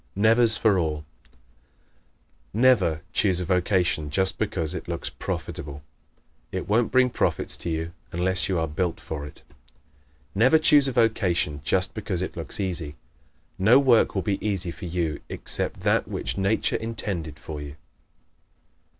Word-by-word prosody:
Nevers 110 Hz, +2 st, +4 dB
for 105 Hz, -4 st, +3 dB
All 75 Hz, -3 st, -1 dB, 0.3 s
¶ -, -, -36 dB, 1.2 s
Never 100 Hz, -10 st, +3 dB
choose 95 Hz, -4 st, +2 dB
a 90 Hz, -, -2 dB
vocation 90 Hz, -4 st, +1 dB
just 95 Hz, +4 st, 0 dB
because 85 Hz, -7 st, -2 dB
it -, -, -6 dB
looks -, -, -4 dB
profitable. 70 Hz, 0 st, -5 dB, 0.7 s
It -, -, -4 dB
won't 110 Hz, +3 st, +2 dB
bring 130 Hz, 0 st, +4 dB
profits -, -, 0 dB
to -, -, -4 dB
you 80 Hz, 0 st, -1 dB, 0.3 s
long 85 Hz, -, -5 dB
unless 95 Hz, +1 st, +2 dB
you 95 Hz, -, +1 dB
are 80 Hz, 0 st, 0 dB
built 80 Hz, +3 st, -2 dB
for 75 Hz, -2 st, -6 dB
it. -, -, -14 dB, 0.9 s
Never 125 Hz, +10 st, +5 dB
choose 150 Hz, -3 st, +5 dB
a -, -, 0 dB
vocation 100 Hz, -, +1 dB
just 95 Hz, +3 st, +1 dB
because 100 Hz, -4 st, -3 dB
it -, -, -5 dB
looks 85 Hz, +3 st, -4 dB
easy. 85 Hz, -6 st, -2 dB, 0.6 s
No 110 Hz, +7 st, +6 dB
work 125 Hz, -5 st, +4 dB
will 95 Hz, -, 0 dB
be 100 Hz, -2 st, -2 dB
easy 95 Hz, -4 st, -1 dB
for 90 Hz, -, -9 dB
you 85 Hz, -3 st, -2 dB
except -, -, 0 dB
that -, -, +1 dB
which -, -, -3 dB
Nature 100 Hz, +3 st, +1 dB
intended 95 Hz, -9 st, -4 dB
for 75 Hz, 0 st, -7 dB
you. 70 Hz, 0 st, -8 dB
95 Hz, 155 wpm, -25 LUFS, 80-110 Hz, 1.2 s, No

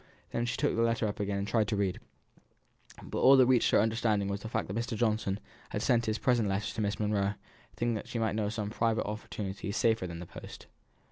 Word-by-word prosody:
Then 120 Hz, 0 st, -1 dB
she 120 Hz, -, -2 dB
took -, -, +1 dB
the 115 Hz, -, +1 dB
letter 115 Hz, -1 st, +2 dB
up 105 Hz, -, -4 dB
again 100 Hz, -1 st, -1 dB
and 100 Hz, 0 st, -2 dB
tried 110 Hz, -1 st, +2 dB
to 105 Hz, -, 0 dB
read; 100 Hz, -2 st, 0 dB, 1.0 s
but -, -, -4 dB
all 135 Hz, +1 st, +7 dB
that 130 Hz, -, +7 dB
reached 125 Hz, -1 st, +4 dB
her -, -, +5 dB
understanding 110 Hz, -2 st, +1 dB
was 100 Hz, 0 st, -3 dB
the 110 Hz, -, -6 dB
fact -, -, -1 dB
that 95 Hz, -, -5 dB
Mr. 115 Hz, 0 st, -2 dB
Johnson 105 Hz, -3 st, 0 dB, 0.3 s
had -, -, -3 dB
sent 115 Hz, -1 st, +2 dB
his 110 Hz, 0 st, +1 dB
present 120 Hz, -5 st, +2 dB
letter 100 Hz, +2 st, -1 dB
to 110 Hz, -, -3 dB
Miss 100 Hz, 0 st, -1 dB
Monro, 105 Hz, -1 st, +1 dB, 0.4 s
thinking 120 Hz, 0 st, 0 dB
that 110 Hz, -, -4 dB
she -, -, -4 dB
might 110 Hz, -3 st, 0 dB
know 110 Hz, 0 st, 0 dB
of 105 Hz, -, -2 dB
some 105 Hz, -2 st, -3 dB
private 115 Hz, 0 st, +1 dB
opportunity 100 Hz, -2 st, -5 dB
safer 110 Hz, -3 st, +1 dB
than 85 Hz, -1 st, -6 dB
the 90 Hz, -, -7 dB
post. -, -, -10 dB
110 Hz, 235 wpm, -31 LUFS, 100-115 Hz, 1.0 s, all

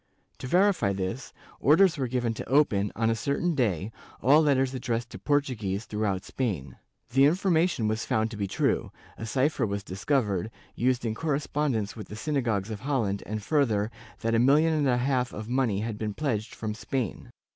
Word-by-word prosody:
To 130 Hz, -, -5 dB
verify 180 Hz, -, +3 dB
this, 100 Hz, +7 st, -4 dB, 0.3 s
orders 165 Hz, +5 st, +5 dB
were 135 Hz, -4 st, -1 dB
given 120 Hz, -1 st, -1 dB
to 110 Hz, -, -7 dB
open, 110 Hz, -8 st, +3 dB
on 115 Hz, 0 st, +1 dB
a -, -, +1 dB
certain 140 Hz, +9 st, 0 dB
day, 110 Hz, -, 0 dB, 0.3 s
all 145 Hz, +6 st, +5 dB
letters 135 Hz, -3 st, +2 dB
addressed 120 Hz, -2 st, -3 dB
to -, -, -8 dB
Portuguese 115 Hz, -9 st, -1 dB
throughout 105 Hz, -3 st, -1 dB
Spain, 85 Hz, -, -3 dB, 0.3 s
The 135 Hz, +3 st, +5 dB
information 170 Hz, -, +2 dB
was 110 Hz, +1 st, -1 dB
found 110 Hz, +1 st, 0 dB
to -, -, -6 dB
be 100 Hz, -1 st, -1 dB
true; -, -, 0 dB, 0.2 s
a 110 Hz, -, -6 dB
cypher 135 Hz, +3 st, +1 dB
was 100 Hz, 0 st, -3 dB
discovered, 100 Hz, -1 st, -1 dB, 0.2 s
used 125 Hz, 0 st, 0 dB
in 110 Hz, -, 0 dB
correspondence 140 Hz, -5 st, -1 dB
with 110 Hz, -4 st, -8 dB
the 105 Hz, -, -8 dB
synagogues 115 Hz, -6 st, -1 dB
of 105 Hz, -, -5 dB
Holland, 115 Hz, -8 st, -1 dB
and 110 Hz, 0 st, -4 dB
further, 115 Hz, -7 st, +1 dB, 0.3 s
that 115 Hz, 0 st, 0 dB
a 115 Hz, -, +4 dB
million 150 Hz, +6 st, +4 dB
and 150 Hz, -3 st, +1 dB
a 125 Hz, -, +3 dB
half 125 Hz, -1 st, 0 dB
of 110 Hz, +1 st, -6 dB
money 120 Hz, -5 st, +1 dB
had 110 Hz, -1 st, -4 dB
been 105 Hz, -2 st, -3 dB
pledged 120 Hz, -7 st, -2 dB
from 110 Hz, -1 st, -3 dB
Spain. 115 Hz, 0 st, -4 dB
120 Hz, 180 wpm, -27 LUFS, 105-140 Hz, 0.3 s, orders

